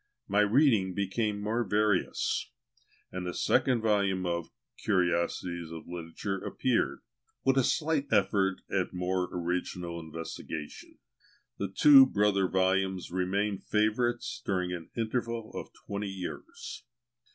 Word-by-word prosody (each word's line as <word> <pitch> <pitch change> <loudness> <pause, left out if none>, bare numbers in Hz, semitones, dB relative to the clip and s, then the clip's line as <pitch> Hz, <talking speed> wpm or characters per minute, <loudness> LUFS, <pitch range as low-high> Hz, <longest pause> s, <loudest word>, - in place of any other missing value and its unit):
My 100 +1 +2
reading 105 - +4
became 105 +1 -1
more 110 +4 0
various, 105 -1 +1 0.6
and 90 0 -4
the 90 0 -4
second 125 -4 +2
volume 100 -4 +1
of 85 -1 -2 0.3
"Curiosities 85 -3 0
of 80 -1 -9
Literature" 90 +3 -4
appeared, 130 -2 0 0.4
with 135 - +4
a 135 - +4
slight 150 0 +1
effort 95 -2 +2
at - - -1
more 90 0 -1
original 85 0 -3
investigation. 80 -2 -7 0.6
The 100 - -1
two 135 +7 +8
brother 100 -4 +2
volumes 95 -1 +1
remained 95 +2 -1
favourites 115 +3 0
during 90 -2 -1
an 85 -2 -7
interval 115 0 -2
of - - -6
twenty 100 0 -3
years. 95 -2 -7
95 Hz, 120 wpm, -30 LUFS, 90-110 Hz, 0.6 s, two